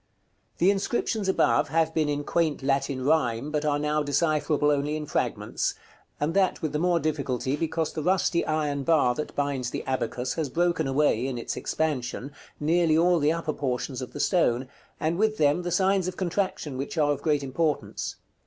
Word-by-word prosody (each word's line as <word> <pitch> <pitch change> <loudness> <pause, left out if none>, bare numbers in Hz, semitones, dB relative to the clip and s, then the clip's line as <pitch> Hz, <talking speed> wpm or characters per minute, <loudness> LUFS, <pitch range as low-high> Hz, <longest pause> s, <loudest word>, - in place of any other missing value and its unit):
The 180 +4 +4
inscriptions 205 0 -1
above 120 -10 +3
have 160 0 +1
been 155 -2 +1
in 145 0 -1
quaint 155 -3 0
Latin 135 -1 0
rhyme, 135 -2 +1
but 150 -1 -1
are 145 -1 +2
now 150 +1 0
decipherable 150 0 +1
only 145 +1 0
in 155 -1 -4
fragments, - - -1 0.4
and 150 +3 0
that 190 -1 +2
with 155 -2 -3
the 150 - 0
more 175 0 +2
difficulty 140 -4 -1
because 160 0 -2
the 155 - -3
rusty 180 0 +2
iron 150 -2 0
bar 140 -4 +3
that 150 +5 -5
binds 140 -4 -1
the - - -4
abacus 130 -1 -2
has 155 -4 -2
broken 170 0 +1
away, 135 -3 +2
in 130 -2 -3
its 120 - -4
expansion, 140 -3 -2 0.3
nearly 160 +1 +3
all 175 +1 +4
the 150 +1 +3
upper 165 -2 -2
portions 130 0 -3
of 125 - -6
the - - -8
stone, 130 -8 +2 0.3
and 165 +3 -1
with 215 0 +2
them 150 +3 +3
the 175 - -3
signs 190 0 +2
of 185 - -4
contraction, 185 -6 -2
which 140 +5 -4
are 145 -2 +3
of 145 - -2
great 150 -3 +1
importance. 150 +3 -2
150 Hz, 185 wpm, -26 LUFS, 140-170 Hz, 0.4 s, The